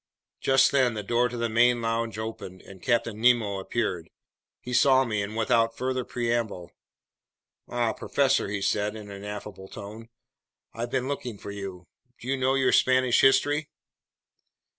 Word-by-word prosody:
Just 135 0 +4
then 130 -4 +2
the 105 - -4
door 120 +4 +1
to 120 - -6
the 115 0 0
main 120 +2 +3
lounge 115 -1 -2
opened 110 -4 -7
and 95 -2 -14
Captain 115 -3 0
Nemo 115 -5 +3
appeared. 95 -5 -3 0.5
He 125 - -7
saw 130 +1 +5
me, 105 -4 -1
and 105 +2 -5
without 115 0 +2
further 130 0 -1
preamble: 115 -8 -2 1.0
"Ah, 120 -2 0
professor," 135 -5 +1
he 100 -1 -3
said 105 +1 0
in 105 -2 -9
an 100 0 -9
affable 105 -2 -7
tone, 110 +3 -10 0.6
"I've 115 +2 -4
been 130 0 -1
looking 125 -6 -4
for 100 - -8
you. 95 -3 -7 0.3
Do 120 - -10
you 135 - +1
know 130 0 +1
your 135 -1 +2
Spanish 130 -1 +4
history?" 145 +3 +3
115 Hz, 160 wpm, -26 LUFS, 105-125 Hz, 1.0 s, saw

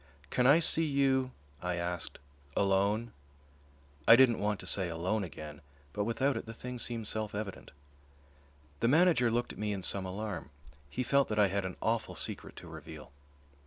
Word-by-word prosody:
"Can 125 0 +3
I 145 +5 +7
see 165 0 +7
you," 135 -2 +2 0.3
I 90 0 -2
asked, 85 0 -4 0.4
"alone?" 100 +4 +1 1.0
I 115 - +10
didn't 120 -2 +5
want 105 -1 -1
to - - -10
say 95 -3 0
"alone" 90 +6 -1
again, 75 -3 -8 0.3
but 105 - -1
without 130 +4 0
it 115 - -5
the 115 - -8
thing 125 +1 -7
seemed 115 -2 -3
self 110 -1 -3
evident. 100 -2 -6 1.1
The - - +2
manager 155 -3 +4
looked 120 +1 -1
at - - -13
me 105 0 -1
in 100 -2 -4
some 95 +1 +1
alarm. 100 -4 -5 0.4
He 125 - -2
felt 140 +2 +3
that 110 - -3
I 105 -2 +4
had 100 0 -1
an 95 - -5
awful 115 0 -1
secret - - -5
to - - -10
reveal. - - -10
110 Hz, 175 wpm, -31 LUFS, 95-125 Hz, 1.1 s, I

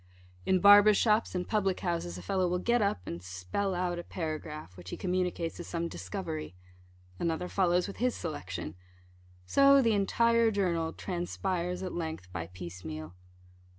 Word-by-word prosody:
In 185 -1 +3
barbers' 205 0 +8
shops 215 -3 +2
and 180 0 -2
public 195 -4 0
houses 170 - -2
a 90 - -9
fellow 185 - +1
will 180 +1 0
get 235 +6 +2
up, 200 - +1
and 85 +1 -5
spell 90 - -3
out 175 -1 -1
a - - -5
paragraph, 155 - -5
which 90 0 -10
he - - -5
communicates 180 -3 -1
as 175 - -6
some 170 0 -2
discovery. 85 - -5 0.6
Another 170 +1 -1
follows 180 -2 +2
with 200 - -7
his 250 +1 +1
selection. 95 - -5 0.7
So 275 - +6
the 230 -4 +3
entire 230 +3 +3
journal 175 -6 0
transpires 180 0 -3
at 185 - -4
length 160 - -5
by 85 -2 -4
piece 90 0 -9
meal. 80 +1 -6
175 Hz, 160 wpm, -30 LUFS, -, 0.7 s, barbers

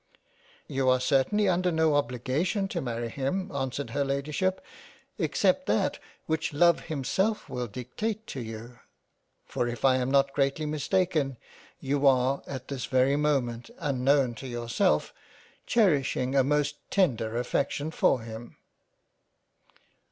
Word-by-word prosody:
" - - -30
You 130 -1 +3
are 130 0 +4
certainly 140 +11 +2
under 180 0 +2
no 160 -1 +2
obligation 145 - 0
to - - -2
marry 120 -2 -3
him 140 +10 -2
answered 135 0 -3
her 140 0 0
Ladyship, 150 +7 -1 0.6
except - - +1
that - - +1 0.3
which 160 -1 -1
love 170 +3 +4
himself 190 - 0
wiil 120 -3 -4
dictate 210 - -4
to 135 - -6
you, 115 +1 -8 0.7
for 120 - -2
if 120 +1 -3
I 130 -1 +5
am 125 0 -1
not 140 0 +3
greatly 140 +2 0
mistaken 150 -2 0 0.4
you 140 +1 +1
are 130 +1 +3
at 130 -2 -6
this 135 -3 -4
very 130 +2 +3
moment 135 - 0
unknown 135 -4 +2
to 135 - -6
yourself, 120 - 0 0.5
cherishing 140 - +2
a 135 - +5
most 145 +1 +1
tender 120 - +1
affection 140 +5 -1
for 130 - +2
him." 115 +1 -9
140 Hz, 135 wpm, -28 LUFS, 125-155 Hz, 0.7 s, I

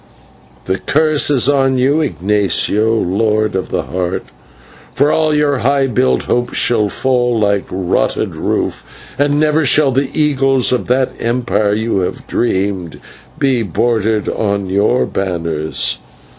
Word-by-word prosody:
"The 95 +1 -1
curse 155 0 +1
is 135 -4 +2
on 135 -2 +2
you, 140 +5 +2
Ignatio, 105 - 0
Lord 110 +2 0
of 95 -1 -3
the - - -2
Heart, 90 0 -3 0.7
for 145 +1 +3
all 155 -1 +2
your 150 -2 +1
high 135 +3 +2
built 65 - +1
hopes 120 0 -1
shall 110 -4 +2
fall 125 0 0
like 100 -2 0
a - - -4
rotted 90 -9 -1
roof, - - -2 0.4
and 145 0 +2
never 155 +1 +2
shall 140 0 +3
the 135 +2 0
eagles 135 -3 +2
of 125 - -1
that 130 +1 +1
empire 115 -3 0
you 110 -2 -1
have 90 - -4
dreamed 95 -6 -2
of - - -17 0.4
be 135 -4 +1
broidered 110 +2 0
on 100 -3 -2
your 105 +6 +2
banners. 85 -5 -2
115 Hz, 145 wpm, -15 LUFS, 100-135 Hz, 0.7 s, for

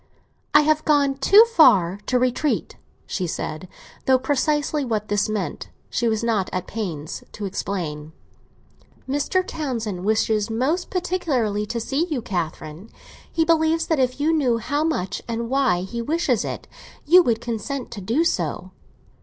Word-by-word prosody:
"I 295 - +9
have 310 +1 +2
gone 285 -2 +3
too 405 +11 +7
far 200 - +5
to 255 - +2
retreat," 255 +4 0 0.3
she 185 - -3
said, 155 +1 -5 0.4
though 260 -1 +6
precisely 290 +2 0
what 215 -4 -2
this 205 +1 +1
meant 200 -8 -3 0.2
she 235 - 0
was 220 0 0
not 220 -5 0
at 185 0 -3
pains 165 -9 -5
to 210 - -5
explain. 165 -6 -4 1.0
"Mr. 290 +7 0
Townsend 230 - -4
wishes 215 +1 +1
most 270 +11 -1
particularly 265 - -1
to 235 - -3
see 275 +9 -1
you, 285 -9 -3
Catherine; 170 +1 -5 0.4
he 325 -1 +1
believes 325 0 +2
that 320 -4 0
if 255 +1 0
you 310 +3 +2
knew 260 -7 +2
how 290 +6 -1
much, 200 - -2
and 230 +1 -3
why, 265 -10 +2
he 235 +6 -5
wishes 285 -3 0
it, - - -6 0.4
you 355 +5 +7
would 235 -8 +1
consent 240 +3 -4
to 205 - -7
do 230 - +1
so." 335 - -2
240 Hz, 155 wpm, -23 LUFS, 205-300 Hz, 1.0 s, I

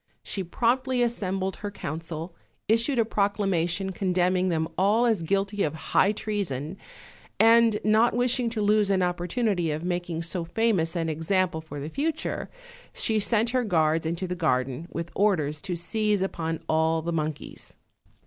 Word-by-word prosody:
She 195 - -3
promptly 245 +7 +1
as 240 0 0
sembled 190 -1 -2
her 205 - -5
council, 165 -1 -6 0.3
issued 230 +5 +2
a 230 - +3
proclamation 195 -3 0
condemning 185 0 +1
them 160 -2 0
all 210 +6 +3
as 220 -7 +2
guilty 195 +4 0
of 155 -2 0
high 195 +4 +2
treason; 195 -8 -3 0.6
and 225 -1 +5
not 220 +3 +4
wishing 245 0 +1
to 225 -2 -2
lose 210 0 +3
an 190 -2 +2
opportunity 180 +1 0
of 155 +2 -3
making 175 -2 -2
so 175 +1 -2
famous 185 -3 0
an 165 -1 -1
example 165 +2 0
for 160 -2 -8
the 140 - -5
future, 300 - -2 0.5
she 220 -1 +1
sent 225 +2 +1
her 255 -1 +1
guards 160 -5 +1
into 170 +3 -2
the 180 - -3
garden, 135 -2 -1
with 170 0 -5
orders 155 -8 +1
to 180 - -3
seize 210 +3 0
upon 165 -4 -3
all 160 0 +2
the 170 +1 -2
monkeys. 155 -2 -4
185 Hz, 160 wpm, -26 LUFS, 165-215 Hz, 0.6 s, and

